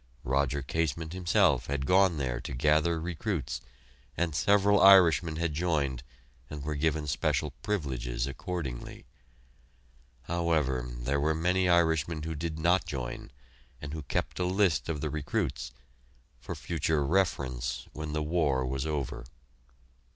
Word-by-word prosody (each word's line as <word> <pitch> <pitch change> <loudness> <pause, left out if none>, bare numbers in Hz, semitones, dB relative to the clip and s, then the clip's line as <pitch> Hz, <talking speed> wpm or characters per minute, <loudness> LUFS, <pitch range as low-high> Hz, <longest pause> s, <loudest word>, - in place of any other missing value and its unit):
Roger 70 +2 0
Casement, 80 +3 -2
himself, 90 - +2
had 70 -1 -2
gone 90 +1 +4
there 65 -4 -2
to 65 - -6
gather 75 +5 +2
recruits, 80 - -3 0.6
and 85 -1 0
several 100 +5 +4
Irishmen 85 -4 +6
had 85 -1 -1
joined 75 -6 0 0.5
and 75 -2 -6
were 75 +1 -2
given 75 +1 0
special 75 +1 0
privileges 65 - -2
accordingly. 70 -2 -5 1.2
However, 80 -7 0
there - - -2
were 80 +2 +1
many 90 +3 +1
Irishmen 80 -2 +2
who 80 +1 -3
did 80 +1 -4
not 85 +4 +2
join, 65 -4 -5 0.5
and 75 0 -7
who 80 - -4
kept 70 - -3
a 90 - +1
list 95 -4 +1
of 75 -3 -2
the 75 - -2
recruits 65 -4 -2 0.7
for - - -6
future 75 -3 -1
reference, 70 -7 -1
when 75 0 -5
the 75 0 -1
war 75 -5 +1
was 65 +3 -2
over! 70 -4 -3
75 Hz, 135 wpm, -29 LUFS, 70-85 Hz, 1.2 s, Irishmen